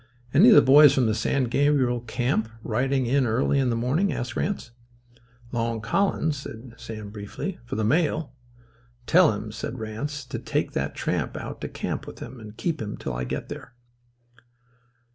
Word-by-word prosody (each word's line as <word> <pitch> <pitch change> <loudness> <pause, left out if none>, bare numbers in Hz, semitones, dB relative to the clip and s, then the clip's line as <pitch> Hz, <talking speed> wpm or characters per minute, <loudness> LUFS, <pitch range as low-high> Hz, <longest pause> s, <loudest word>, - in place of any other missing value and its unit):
"Any 185 - +8
of 220 - +8
the - - +8
boys 145 +1 +8
from 130 - +3
the 110 - +2
San 120 +5 0
Gabriel 130 -1 +2
camp 120 -1 -1
riding 130 +3 0
in 130 +1 +2
early 125 +5 +2
in 130 -2 +2
the 115 - +1
morning?" 135 +12 +1
asked 120 0 -4
Ranse. 195 -11 -2 0.8
"Long 115 -1 -1
Collins," 155 - 0
said 120 -3 -9
Sam 110 -3 -8
briefly. 105 - -6
"For - - -5
the 110 - -1
mail." 150 +2 +1 0.7
"Tell 175 +2 +6
him," 105 +1 -5
said 110 +3 -5
Ranse, 130 +6 -5
"to - - -4
take - - -1
that - - -2
tramp - - -2
out - - -7
to - - -3
camp - - -4
with - - -9
him 130 - -9
and 110 -1 -11
keep 165 -6 -2
him 105 -1 -4
till 65 - -4
I 60 +1 -3
get - - -4
there." 125 - -9
125 Hz, 180 wpm, -25 LUFS, 110-145 Hz, 0.8 s, Any